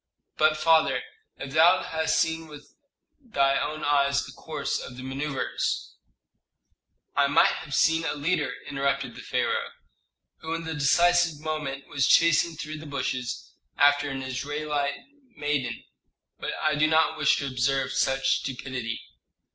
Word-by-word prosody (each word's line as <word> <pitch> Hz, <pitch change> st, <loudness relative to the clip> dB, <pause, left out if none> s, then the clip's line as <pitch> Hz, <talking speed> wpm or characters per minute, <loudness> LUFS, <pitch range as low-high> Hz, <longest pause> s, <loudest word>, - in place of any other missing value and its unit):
"But, 155 Hz, 0 st, +3 dB
father, 160 Hz, -, +3 dB, 0.3 s
if 135 Hz, 0 st, -7 dB
thou 170 Hz, +4 st, +5 dB
hadst 160 Hz, 0 st, 0 dB
seen 160 Hz, 0 st, 0 dB
with 150 Hz, -1 st, -13 dB, 0.5 s
thy 140 Hz, -, +1 dB
own 155 Hz, 0 st, -4 dB
eyes 140 Hz, -1 st, +2 dB
the -, -, -10 dB
course 155 Hz, -3 st, -4 dB
of 125 Hz, -, -9 dB
the 130 Hz, -, -8 dB
manœuvres 135 Hz, +1 st, -3 dB, 0.6 s
" -, -, -50 dB
"I 140 Hz, 0 st, +4 dB
might 140 Hz, -, +5 dB
have 150 Hz, -3 st, -4 dB
seen 160 Hz, 0 st, +3 dB
a 160 Hz, -, -2 dB
leader," 145 Hz, -2 st, 0 dB, 0.2 s
interrupted 140 Hz, -2 st, -1 dB
the -, -, -10 dB
pharaoh, -, -, -1 dB, 0.7 s
"who 160 Hz, +1 st, -4 dB
in 165 Hz, -, -5 dB
the 160 Hz, 0 st, -4 dB
decisive 170 Hz, +2 st, +3 dB
moment 150 Hz, -3 st, -4 dB
was 140 Hz, -2 st, 0 dB
chasing 170 Hz, 0 st, +4 dB
through 155 Hz, 0 st, -6 dB
the 155 Hz, -, -10 dB
bushes 130 Hz, -4 st, -4 dB, 0.2 s
after 145 Hz, 0 st, +4 dB
an 135 Hz, -1 st, -4 dB
Israelite 145 Hz, +2 st, -3 dB, 0.3 s
maiden. 145 Hz, -3 st, -2 dB, 0.6 s
But -, -, -3 dB
I 155 Hz, -, +1 dB
do 150 Hz, +1 st, +3 dB
not 160 Hz, +1 st, +3 dB
wish 150 Hz, -, +3 dB
to 140 Hz, -, -3 dB
observe 135 Hz, +1 st, 0 dB
such 135 Hz, 0 st, +1 dB
stupidity." 125 Hz, -3 st, -5 dB
145 Hz, 145 wpm, -26 LUFS, 135-160 Hz, 0.7 s, thou